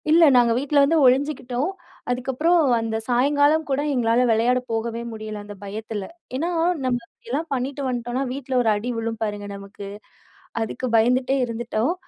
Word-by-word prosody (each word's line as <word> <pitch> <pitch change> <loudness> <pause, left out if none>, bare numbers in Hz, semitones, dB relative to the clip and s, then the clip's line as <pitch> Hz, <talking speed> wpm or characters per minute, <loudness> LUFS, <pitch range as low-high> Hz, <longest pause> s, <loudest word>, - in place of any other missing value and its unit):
இல்ல 330 +2 +6
நாங்க 240 -1 +5
வீட்ல 285 +3 0
வந்து 320 +4 +3
ஒழிஞ்சுகிட்டோம். 260 +2 +1 0.4
அதுக்கப்புறம், 265 +8 +2 0.2
அந்த 225 -1 -2
சாயங்காலம் 285 +5 +3
கூட 275 +1 +1
எங்களால 235 -1 +2
வெளையாட 235 +3 +3
போகவே 230 +1 -2
முடியல 215 -1 -6
அந்த 205 0 -9
பயத்துல. 210 0 -5 0.3
ஏன்னா, 325 +6 -1 0.4
நம்ம 250 -1 +1
இப்டில்லாம் 290 +8 -5
பண்ணிட்டு 270 +2 -2
வந்ட்டோம்ன்னா, 245 +1 -2
வீட்ல 265 0 -5
1 230 - +2
அடி 215 +4 -3
விழும் 225 -1 -3
பாருங்க 205 -1 -3
நமக்கு. 200 0 -9 0.7
அதுக்கு 225 +3 -3
பயந்துட்டே 250 +4 +3
இருந்துட்டோம். 235 +4 -1
245 Hz, 145 wpm, -23 LUFS, 225-275 Hz, 0.7 s, இல்ல